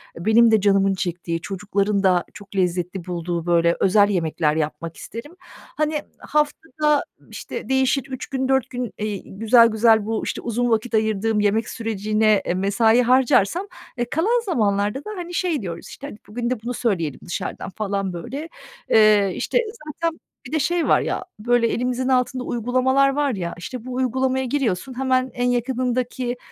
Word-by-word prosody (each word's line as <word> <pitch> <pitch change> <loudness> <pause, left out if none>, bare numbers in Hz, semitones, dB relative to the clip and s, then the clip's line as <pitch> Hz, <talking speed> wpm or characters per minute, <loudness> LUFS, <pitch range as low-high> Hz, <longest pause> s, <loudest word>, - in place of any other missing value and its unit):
benim 220 +6 +4
de 220 -2 +4
canımın 195 -1 +3
çektiği, 170 -2 -3
çocukların 200 +1 -1
da 180 -2 +3
çok 200 -1 -13
lezzetli 180 -1 -1
bulduğu, 175 -1 -3
böyle, 170 -1 +3
özel 205 +2 +4
yemekler 160 -4 0
yapmak 160 +1 -3
isterim. 290 +10 -9 0.4
Hani, 305 0 0 0.2
haftada, 300 0 0 0.3
işte, - - -7
değişir 265 0 +2
3 260 -1 -5
gün, 265 -1 -2
4 265 -1 +1
gün, 250 -2 -4
iii, 210 -2 -3
güzel 230 +1 +6
güzel 220 -1 +3
bu, 225 0 -2
işte, - - -3
uzun 240 +1 -1
vakit 225 +1 0
ayırdığım 220 0 +1
yemek 210 +2 +1
sürecine, 215 -1 +1
eee, - - 0
mesai 220 +5 +3
harcarsam, 255 - +3 0.3
eee, 240 - 0
kalan 445 - +2
zamanlarda 210 - +1
da, - - -6
hani, 350 0 -6
şey 340 -7 0
diyoruz, 170 -3 -6
işte, 285 - -9
"Hadi, 210 - -9
bugün 235 +3 -3
de 250 -4 -2
bunu 245 +2 -4
söyleyelim 170 - -1
dışarıdan." 175 - -4
falan, 195 -1 -3
böyle. 275 - -6 0.4
Eee, 210 -3 +5
işte, - - -1 0.3
zaten 330 +2 -3 0.3
bir - - -12
de 315 - +1
şey 340 +3 0
var - - +4
ya, - - -3
böyle, 235 +1 +2
elimizin 250 +2 -1
altında 255 0 +1
uygulamalar 255 +4 +2
var 280 -1 0
ya, 170 -2 -4
işte, 245 +6 -7
bu 255 - -6
uygulamaya 260 +1 0
giriyorsun, 255 -2 -2
hemen 260 -1 +1
en 245 0 0
yakınındaki, 245 0 -1
230 Hz, 165 wpm, -22 LUFS, 200-260 Hz, 0.4 s, güzel